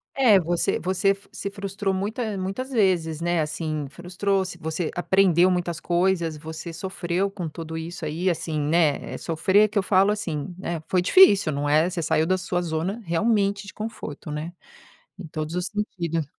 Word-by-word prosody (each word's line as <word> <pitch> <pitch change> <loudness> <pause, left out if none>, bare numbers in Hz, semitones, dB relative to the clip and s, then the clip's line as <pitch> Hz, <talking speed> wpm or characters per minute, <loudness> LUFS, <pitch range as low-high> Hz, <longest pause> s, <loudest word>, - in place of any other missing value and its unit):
É 225 -8 +6
você 175 0 0
você 190 +2 +1 0.2
se 200 - -5
frustrou 200 0 -3
muita 210 +2 -2
muitas 195 +8 -4
vezes, 175 - +1
né, 175 -1 +1
assim, 155 -1 -3
frustrou, 180 +5 -1 0.2
você 160 +1 -2
aprendeu 185 -1 +4
muitas 175 -2 -1
coisas, 175 -2 +1
você 160 +2 -7
sofreu 185 +1 -2
com 185 -4 -5
tudo 160 +1 -6
isso 165 +1 -6
aí, 165 +5 -1
assim, 160 -2 -2
né, 150 0 +1
sofrer 190 +6 +3
que 210 - -4
eu 200 - +3
falo 195 +2 +4
assim, 180 -5 -3
né, 170 -4 -4
foi 180 -1 +2
difícil, 200 - +6
não 145 +1 -1
é, 155 +4 +4
você 175 -2 -3
saiu 155 0 +2
da 185 +2 +2
sua 180 -1 -2
zona 170 +5 -2
realmente 200 +3 +1
de 185 - -9
conforto, 160 -9 -6
né, 155 +3 -4 0.7
em 180 - -7
todos 155 +1 -4
os 180 +1 -1
sentidos. 170 -6 -2
175 Hz, 170 wpm, -24 LUFS, 160-195 Hz, 0.7 s, É